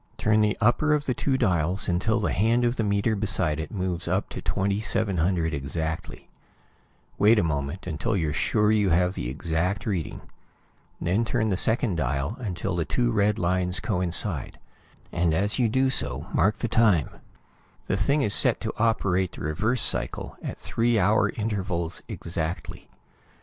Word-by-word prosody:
Turn 110 0 +3
the 105 -1 +1
upper 150 +7 +3
of 145 -1 -2
the 130 - 0
two 135 +1 0
dials 90 -2 0
until 105 +6 +1
the 105 - 0
hand 115 +5 +2
of 120 +1 +1
the 115 - -1
meter 100 +2 +1
beside 95 -7 0
it 80 - -4
moves 90 -3 -3
up - - 0
to - - -6
2700 95 -4 0
exactly. 80 +5 -4 0.9
Wait 110 +3 +6
a 105 - +3
moment, 75 +2 -3
until 90 +6 -1
you're 80 -4 -1
sure 105 +7 +2
you 105 -3 +3
have 90 +2 +2
the - - -4
exact 85 - -2
reading. 95 -8 -3 0.8
Then 95 +7 +1
turn 110 -1 0
the - - +2
second 110 -1 0
dial 70 - -1
until 95 -4 -3
the 85 - 0
two 120 +7 0
red 105 -1 +2
lines 90 -1 +1
coincide, 90 - -1 0.5
and 85 -2 +1
as 100 +7 0
you 120 -3 +3
do 130 +3 +2
so, 65 - -1
mark 105 +2 +2
the 120 - -2
time. 105 - +3 0.7
The - - 0
thing 140 +9 +2
is 105 - +3
set - - +3
to - - -3
operate 100 -5 +1
the - - -10
reverse 105 - 0
cycle - - -2
at - - -5
three 115 0 0
hour 105 +1 +3
intervals 95 -6 -3
exactly. 85 0 -5
95 Hz, 165 wpm, -26 LUFS, 85-110 Hz, 0.9 s, Wait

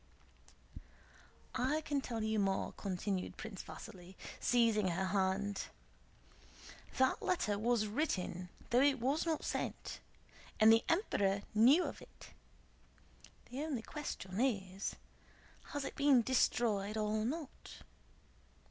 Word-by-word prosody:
"I 265 +5 +1
can 290 -2 -1
tell 230 -4 -3
you 220 0 +1
more," 195 -1 0
continued 190 -1 -3
Prince 215 -4 -6
Vasíli, 185 0 -11 0.2
seizing 230 -4 +3
her 185 +2 0
hand, 195 +1 0 1.3
"that 260 0 +3
letter 210 - 0
was 230 0 +2
written, 195 - -2 0.2
though 245 +2 +5
it 280 -1 +4
was 275 +8 0
not 320 -2 -1
sent, - - -3 0.6
and 220 +1 +8
the 225 - +4
Emperor 200 - +1
knew 255 +11 +6
of - - -5
it. - - -14 1.2
The 260 +3 -4
only 290 -7 -2
question 225 -10 -4
is, 195 -6 -1 0.7
has 290 -2 -4
it - - -4
been 280 -4 +5
destroyed 220 -4 +1
or 215 0 0
not? 290 +4 -6
220 Hz, 115 wpm, -35 LUFS, 200-270 Hz, 1.3 s, and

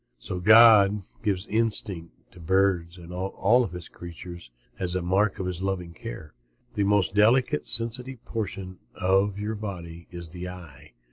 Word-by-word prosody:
So 90 - -6
God 105 -1 +7 0.2
gives 100 -3 -1
instinct 105 -6 -1
to 90 - -15
birds 90 0 +1
and 85 0 -11
all 100 +6 +1
his 90 -1 -8
creatures 85 -2 -10 0.3
as 90 -1 -2
a 90 - -1
mark 95 +3 +1
of 95 - -4
his 90 -1 -4
loving 95 -3 -3
care. 75 0 -9 0.4
The 100 - 0
most 100 -4 +2
delicate, 110 - +3
sensitive 120 +2 -2
portion 95 -4 -5 0.2
of 95 +2 +1
your 105 +2 -3
body 85 -6 -7
is 85 -1 -8
the 90 +2 -7
eye. 90 -8 -12
95 Hz, 150 wpm, -26 LUFS, 85-105 Hz, 0.4 s, God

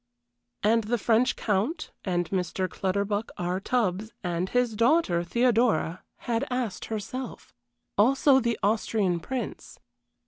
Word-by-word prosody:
And 225 +1 +3
the 240 +3 +1
French 230 +3 +2
Count, 225 - -1
and 175 -3 0
Mr. 185 0 -1
Clutterbuck 200 +4 -1
R. 180 +1 -1
Tubbs 215 -2 -1
and 175 +1 -1
his 245 -3 +1
daughter, 230 - +3
Theodora 230 -5 +2 0.2
had 230 -1 0
asked 250 -6 -2
herself. 225 +4 -6 0.5
Also 265 +4 +5
the 235 -2 0
Austrian 205 -3 +1
Prince. 250 +4 -5
215 Hz, 115 wpm, -27 LUFS, 185-245 Hz, 0.5 s, Also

